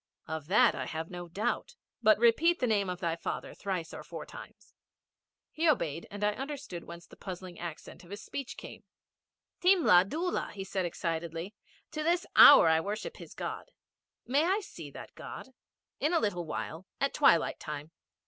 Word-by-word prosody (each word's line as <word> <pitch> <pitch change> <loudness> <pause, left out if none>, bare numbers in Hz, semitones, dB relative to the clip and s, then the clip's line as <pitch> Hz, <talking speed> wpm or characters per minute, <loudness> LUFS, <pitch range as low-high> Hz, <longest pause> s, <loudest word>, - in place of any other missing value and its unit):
'Of 160 -2 -5
that 200 +4 +5
I - - -4
have 160 +1 -5
no 175 -1 -6
doubt. 205 - -2 0.3
But 215 0 +6
repeat 295 +10 +4
the 255 - +1
name 205 -5 +1
of 180 0 -5
thy 165 -2 0
father 165 - -5
thrice 185 -5 -4
or - - -7
four - - -8
times.' - - -13 0.8
He 320 +1 +2
obeyed, 165 - 0
and 205 +1 -6
I 210 - +3
understood 270 - -6
whence 170 0 -10
the - - -16
puzzling 185 -2 -8
accent 170 +1 -8
in 175 - -16
his 205 +1 -6
speech 275 -3 -6
came. - - -10 0.8
'Thimla 345 - +6
Dhula,' 345 -2 -2
said 190 -1 -2
he - - +1
excitedly. 165 +2 -4 0.4
'To 310 - -3
this 345 +3 +1
hour 285 - +10
I 160 0 +5
worship 215 - -4
his - - -11
God.' - - -5 0.6
'May 285 +5 +2
I 390 +4 +2
see - - -9
that - - -10
God?' - - -9 0.5
'In 305 +4 +1
a 335 - +4
little 180 - -1
while 165 +3 -5
at 275 - +1
twilight 220 - +4
time.' 150 +1 -6
195 Hz, 175 wpm, -31 LUFS, 170-285 Hz, 0.8 s, hour